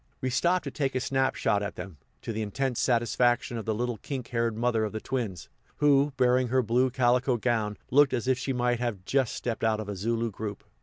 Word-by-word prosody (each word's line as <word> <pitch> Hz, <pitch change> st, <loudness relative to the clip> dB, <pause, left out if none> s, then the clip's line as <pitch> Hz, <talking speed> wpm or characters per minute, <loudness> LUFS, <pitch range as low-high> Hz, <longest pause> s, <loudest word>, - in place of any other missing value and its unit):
We 130 Hz, -, -2 dB
stopped 175 Hz, +8 st, +2 dB
to -, -, -5 dB
take 135 Hz, -4 st, -2 dB
a -, -, +2 dB
snap 135 Hz, +1 st, 0 dB
shot 105 Hz, -, +1 dB
at 100 Hz, 0 st, -4 dB
them, 90 Hz, -3 st, -8 dB, 0.3 s
to 115 Hz, -, -4 dB
the 110 Hz, -, -3 dB
intense 125 Hz, +4 st, -2 dB
satisfaction 120 Hz, 0 st, +1 dB
of 115 Hz, -, -4 dB
the 110 Hz, -1 st, 0 dB
little 120 Hz, +1 st, -2 dB
kink 130 Hz, -4 st, -5 dB
haired 115 Hz, -2 st, -1 dB
mother 115 Hz, -1 st, +1 dB
of 110 Hz, -, -3 dB
the 110 Hz, -, -3 dB
twins, 110 Hz, -9 st, -4 dB, 0.3 s
who, 145 Hz, 0 st, +4 dB
barring 125 Hz, 0 st, +3 dB
her 130 Hz, +1 st, +2 dB
blue 125 Hz, +3 st, +2 dB
calico 125 Hz, 0 st, +2 dB
gown, 110 Hz, -3 st, -1 dB
looked 145 Hz, +1 st, +5 dB
as 125 Hz, -1 st, -2 dB
if 130 Hz, -1 st, +2 dB
she 130 Hz, +1 st, -2 dB
might 125 Hz, -1 st, 0 dB
have 110 Hz, -7 st, -3 dB
just 135 Hz, -1 st, +1 dB
stepped 115 Hz, -2 st, -4 dB
out 110 Hz, -1 st, +2 dB
of 110 Hz, -, -5 dB
a 100 Hz, -, -4 dB
Zulu 115 Hz, +3 st, -1 dB
group. 105 Hz, 0 st, -6 dB
120 Hz, 225 wpm, -28 LUFS, 110-130 Hz, 0.3 s, looked